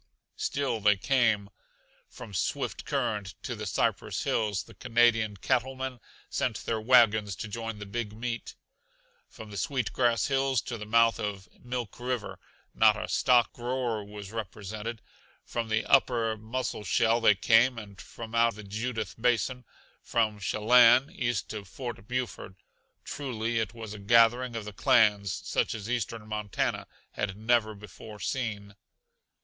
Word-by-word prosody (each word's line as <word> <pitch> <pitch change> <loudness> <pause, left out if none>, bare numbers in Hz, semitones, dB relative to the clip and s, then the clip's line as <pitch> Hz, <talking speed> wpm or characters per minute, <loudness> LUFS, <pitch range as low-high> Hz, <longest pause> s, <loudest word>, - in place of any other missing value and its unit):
Still 140 -5 -1
they 105 -1 +4
came. 110 -3 +1 0.6
From 105 - -11
Swift 90 - -2
Current 100 -3 -2
to - - -4
the - - -5
Cypress - - -1
Hills 105 -3 0
the - - -15
Canadian 115 -4 +2
cattlemen 130 +3 -1 0.3
sent 120 -4 -2
their 110 -1 -1
wagons 110 -4 +4
to 110 - -6
join 115 +1 -5
the 105 - -7
big 105 +1 -4
meet. 115 +2 -5 0.7
From 110 -1 -11
the 100 - -7
Sweet 125 +2 -1
Grass 120 -4 +2
Hills 135 -2 +1
to 120 -3 -5
the 105 - -7
mouth 115 +1 +4
of 100 -2 -4 0.2
Milk 120 -4 -5
River 125 -3 -3 0.3
not - - +5
a - - -4
stock 120 -2 +3
grower 120 -3 -2
but 100 - -14
was 105 -2 -8
represented. 110 +1 -6 0.4
From 115 -1 -3
the 110 0 +1
upper 115 -4 +3
Musselshell 115 0 0
they 105 -3 +6
came, 115 +5 +4
and 100 -3 -9
from 115 -1 -10
out 115 -1 +3
the 105 - -9
Judith 110 +2 -4
Basin; 125 +1 +1 0.4
from 110 -3 0
Shellanne 120 - +5
east 120 - -2
to 105 -2 -5
Fort 115 +2 -7
Buford. 120 -6 -4 0.5
Truly 120 -5 -2
it 110 +1 -3
was 110 -2 -7
a 105 - -8
gathering 115 +3 +4
of 110 -2 -4
the 105 - -7
clans 105 -2 +3
such - - -1
as 105 -2 -6
eastern 115 -2 -3
Montana 105 -2 -2 0.2
had 95 -1 -3
never 110 -1 +1
before 105 +1 -11
seen. 105 -6 -3
115 Hz, 150 wpm, -28 LUFS, 105-120 Hz, 0.7 s, they